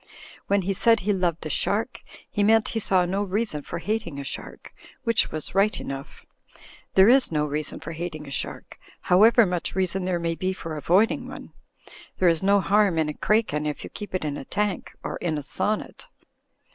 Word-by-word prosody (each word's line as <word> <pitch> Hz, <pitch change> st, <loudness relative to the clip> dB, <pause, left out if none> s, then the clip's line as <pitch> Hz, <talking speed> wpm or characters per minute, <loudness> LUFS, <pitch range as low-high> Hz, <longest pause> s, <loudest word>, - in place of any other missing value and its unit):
When 200 Hz, -1 st, +2 dB
he 195 Hz, +2 st, 0 dB
said 225 Hz, +3 st, +3 dB
he 205 Hz, +2 st, +1 dB
loved 175 Hz, -4 st, -1 dB
a -, -, -3 dB
shark, 225 Hz, -, -1 dB, 0.3 s
he 205 Hz, -, -2 dB
meant 220 Hz, +2 st, +4 dB
he 225 Hz, -, -2 dB
saw 185 Hz, -4 st, +2 dB
no 190 Hz, +3 st, -1 dB
reason 205 Hz, -5 st, -2 dB
for 170 Hz, -, -6 dB
hating 185 Hz, -5 st, -3 dB
a -, -, -4 dB
shark, 135 Hz, -, -7 dB, 0.3 s
which 230 Hz, -3 st, +1 dB
was 155 Hz, -1 st, -4 dB
right 200 Hz, +3 st, +2 dB
enough. 135 Hz, 0 st, -8 dB, 0.7 s
There 190 Hz, +1 st, +7 dB
is 255 Hz, -2 st, +5 dB
no 150 Hz, -1 st, +1 dB
reason 150 Hz, 0 st, -3 dB
for 165 Hz, -, -7 dB
hating 160 Hz, -2 st, -5 dB
a 140 Hz, -, -10 dB
shark, -, -, -5 dB, 0.2 s
however 220 Hz, +5 st, +5 dB
much 180 Hz, -2 st, -2 dB
reason 185 Hz, 0 st, 0 dB
there 180 Hz, -1 st, 0 dB
may 170 Hz, -1 st, -1 dB
be 185 Hz, +3 st, -2 dB
for 165 Hz, -4 st, -6 dB
avoiding 180 Hz, -, +2 dB
one. -, -, -10 dB, 0.6 s
There 180 Hz, -, +4 dB
is 165 Hz, -1 st, +1 dB
no 200 Hz, +1 st, +4 dB
harm 200 Hz, -3 st, +3 dB
in 155 Hz, -1 st, +1 dB
a -, -, -3 dB
craken 180 Hz, -7 st, 0 dB
if 150 Hz, -, -4 dB
you -, -, -9 dB
keep 205 Hz, -3 st, -7 dB
it 185 Hz, -, -2 dB
in 145 Hz, -1 st, -2 dB
a -, -, -8 dB
tank 205 Hz, +2 st, -2 dB
— -, -, -41 dB
or -, -, -4 dB
in 160 Hz, -3 st, -2 dB
a 145 Hz, -, -4 dB
sonnet. 210 Hz, +9 st, -2 dB
185 Hz, 205 wpm, -25 LUFS, 160-210 Hz, 0.7 s, There